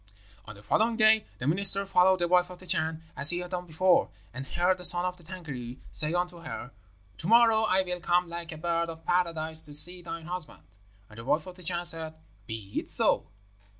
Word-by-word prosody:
"On 105 - -11
the 100 - -17
following 225 - 0
day 220 -1 +3
the 125 - -6
minister 195 +5 +2
followed 190 -1 +2
the 175 -1 -2
wife 180 0 +2
of 180 - -12
the 185 - -15
Chan 160 -1 -3
as 140 +2 +6
he 175 - +3
had 180 0 -7
done 180 -1 -6
before, 180 +3 +1 0.2
and 130 +2 -8
heard 180 +4 -1
the - - -11
son 175 0 +8
of 180 0 -4
the 175 - -20
Tângâri 145 -9 -9
say 150 0 +3
unto 175 0 -4
her, 135 -6 -9 0.5
'To 160 - -7
morrow 225 0 +4
I 190 -2 +1
will 180 -1 -6
come 175 +1 0
like 170 0 -7
a 160 - -8
bird 170 +1 -3
of 165 0 -11
Paradise 165 -3 +1
to 145 -1 -2
see 180 +4 +4
thine 165 -1 -9
husband.' 175 - -7 0.4
And 110 +1 -15
the 115 - -10
wife 155 +5 -1
of 185 - -11
the 185 - -16
Chan 175 0 -3
said, 160 -2 +4 0.3
'Be 110 -3 -6
it - - -6
so.' - - +4
175 Hz, 220 wpm, -26 LUFS, 160-180 Hz, 0.5 s, son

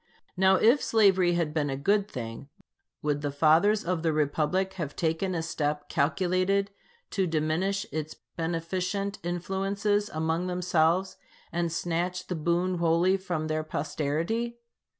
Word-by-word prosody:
Now 190 +1 +5
if 235 +9 +4
slavery 190 -5 +4
had 165 -3 0
been 150 -2 0
a 135 - -2
good 200 +7 +1
thing, 115 - -7 0.5
would 145 -1 0
the 145 - -1
fathers 165 +9 +3
of 175 -1 -1
the 165 -1 +1
republic 155 +5 0
have 160 -7 -5
taken 170 +3 -1
a 165 - -1
step 150 -2 -2
calculated 185 +6 +1 0.4
to 190 -2 0
diminish 165 +6 0
its 155 0 -4 0.2
beneficent 180 +4 -2
influences 195 +4 -1
among 160 +3 -1
themselves, 180 0 +1 0.3
and 170 -1 -1
snatch 175 +2 -2
the 180 - -3
boon 175 +3 0
wholly 170 +3 +3
from 175 -5 -3
their 155 0 -1
posterity? 160 +11 -2
175 Hz, 135 wpm, -28 LUFS, 155-190 Hz, 0.5 s, Now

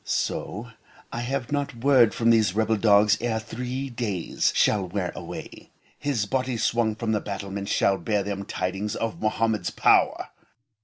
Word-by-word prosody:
so 105 +6 -2 0.4
I 115 - -4
have 125 +1 -3
not 140 -2 -1
word 125 -2 +4
from 115 0 +3
these 110 -5 +3
rebel 110 +1 +2
dogs 105 0 +4
ere 115 -2 0
three 125 +4 -5
days 105 -7 -1
shall 100 -3 +2
wear 90 -1 -2
away, - - -9 0.3
his 135 -8 -1
body 130 +2 -1
swung 115 0 +1
from 115 0 -2
the 105 - +1
battlements 100 0 -5
shall 95 - +2
bear 105 +2 0
them 100 0 -4
tidings 95 +3 -3
of 115 -1 -3
Mohammed's 110 -3 0
power. - - +3
110 Hz, 155 wpm, -25 LUFS, 100-120 Hz, 0.4 s, word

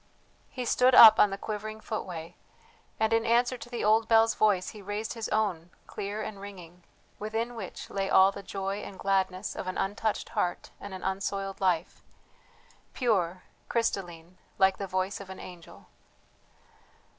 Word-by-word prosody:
He 250 -1 -5
stood 250 +2 +4
up 220 -2 +10
on 210 - +6
the 195 - -4
quivering 215 +1 -5
footway, 175 -7 -6 0.6
and 220 0 +2
in 225 0 +3
answer 240 +2 +2
to 240 -1 -10
the 240 - -4
old 220 +2 +3
bell's 225 0 +5
voice 205 -4 +2
he 215 - -11
raised 205 +3 -4
his 230 -2 -5
own, 190 -6 -1 0.2
clear 205 +2 -5
and 210 -2 -7
ringing, 180 -3 -11 0.4
within 225 +3 -3
which 220 -6 -7
lay 195 -1 -2
all 190 +1 +6
the 200 - -8
joy 195 0 -4
and 200 -2 -8
gladness 190 0 -1
of - - -5
an 185 - -3
untouched 205 +2 -2
heart 175 -1 -2
and 200 -1 -8
an 185 - -9
unsoiled 195 0 -3
life, 180 -3 0 0.9
pure, 185 -8 0 0.3
crystalline, 180 -6 -2 0.2
like 190 -1 +4
the 200 - -3
voice 185 +1 -2
of 195 - -11
an 190 - -8
angel. 175 -2 -12
200 Hz, 160 wpm, -28 LUFS, 185-220 Hz, 0.9 s, up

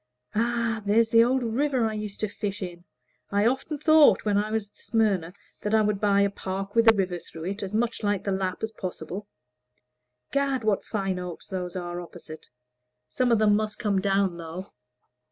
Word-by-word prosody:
Ah, 230 0 0
there's 220 +3 +3
the 230 0 +6
old 255 +2 +1
river 250 +1 +1
I 220 - -1
used 210 -2 -5
to 215 - +1
fish 205 0 -4
in. 175 -1 -8 0.4
I 205 +1 +2
often 265 +5 0
thought, 310 -3 +5
when 205 -1 +2
I 205 +1 +1
was 215 -2 -2
at - - -22
Smyrna, 200 -7 0 0.3
that 210 +1 +1
I 220 - +4
would 210 -1 0
buy 200 -1 +4
a 200 - +3
park 195 0 -5
with 230 -1 +7
a - - -2
river 185 -3 -1
through 165 -1 -11
it 195 +4 -4
as 200 +1 -4
much 235 +1 0
like 205 -2 0
the 200 - -1
Lapp 190 0 -2
as 220 - -1
possible. 185 0 -6 1.0
Gad, 275 -3 0
what 215 -2 +1
fine 195 -4 -2
oaks 180 -2 -7
those 180 -2 -5
are 175 -1 -4
opposite! 170 -2 -11 0.6
Some 245 - +1
of 230 - +5
them 210 -1 +4
must 215 0 -1
come 200 -3 0
down, 195 -2 +1
though." 170 +3 -7
205 Hz, 195 wpm, -26 LUFS, 190-225 Hz, 1.0 s, with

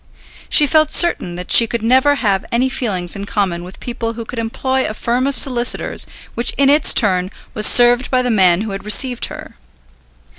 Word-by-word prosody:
She 300 - +5
felt 310 +1 +1
certain 265 - +1
that 180 +1 -8
she 230 - +6
could 230 0 -5
never 260 +5 +2
have 200 -7 -1
any 250 +3 0
feelings 190 -9 -3
in 200 0 -7
common 190 -5 -3
with 180 +2 -12
people 230 -2 -5
who 230 0 -8
could 235 - -7
employ 260 +3 -2
a 215 - -5
firm 245 +4 -2
of 280 -2 -4
solicitors 245 -2 0 0.3
which 235 +1 -1
in 275 0 +3
its 295 0 +3
turn 185 -5 +1 0.2
was 215 0 +2
served 245 +1 +4
by 255 -1 0
the 250 - -1
man 185 -4 +2
who 215 -1 -5
had 195 0 -7
received 245 +4 +2
her. - - -11
235 Hz, 195 wpm, -16 LUFS, 200-260 Hz, 0.3 s, she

